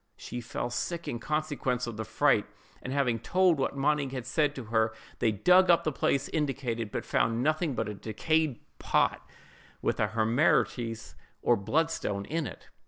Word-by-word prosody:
She 120 - -6
fell 120 +1 -4
sick 170 +7 -3
in 120 - -3
consequence 145 -4 -1
of 120 -2 -6
the 110 +1 -4
fright, - - +2 0.3
and 130 - -5
having 130 -4 +1
told 180 +5 +3
what 135 +1 -1
Monig 140 -1 +1
had 130 -3 -4
said 145 +2 +1
to 130 - -6
her, 110 0 +2 0.2
they 110 - +3
dug 180 - +5
up 170 - +5
the 155 - 0
place 135 0 0
indicated, 130 -7 -2
but - - -4
found 115 +1 +1
nothing 155 -1 +1
but - - -1
a 105 - -4
decayed 140 +7 -1 0.2
pot - - +1 0.6
with - - -1
a - - +3
hemarites 115 - +1 0.3
or - - +4
bloodstone 100 -4 -1
in 160 +1 -2
it. - - -11
130 Hz, 170 wpm, -29 LUFS, 115-155 Hz, 0.6 s, dug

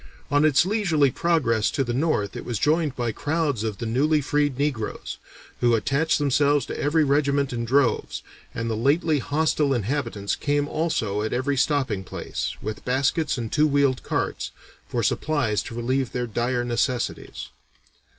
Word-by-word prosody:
On 145 +1 +4
its 155 +1 +4
leisurely 175 - +2
progress 125 -10 +1
to 135 - 0
the 120 -2 -3
north 125 -7 0
it - - -5
was 120 -3 -3
joined 155 0 +1
by 120 -2 -1
crowds 145 -3 -1
of 110 -3 -3
the 120 - -5
newly 145 +7 +2
freed 145 -1 0
negroes, 135 -7 -3 0.4
who 120 -1 +3
attached 140 +8 +1
themselves 145 0 +2
to - - -6
every 155 +2 +2
regiment 140 -1 +1
in 115 -1 -2
droves, 130 +1 +1 0.3
and 115 - -4
the 115 - -1
lately 145 +6 +2
hostile 145 0 +1
inhabitants 115 -3 -2
came 145 0 0
also 115 -11 -1
at 110 - -2
every 130 +3 0
stopping 135 -7 0
place, - - -4
"with 110 -1 -5
baskets 140 +4 0
and 115 -2 -4
two 155 0 +3
wheeled 140 -3 +2
carts" - - -2 0.4
for - - -2
supplies 140 -9 0
to 115 - -8
relieve 130 +2 -1
their 125 0 -1
dire 120 +2 -1
necessities. 120 +1 -2
135 Hz, 160 wpm, -24 LUFS, 120-150 Hz, 0.4 s, On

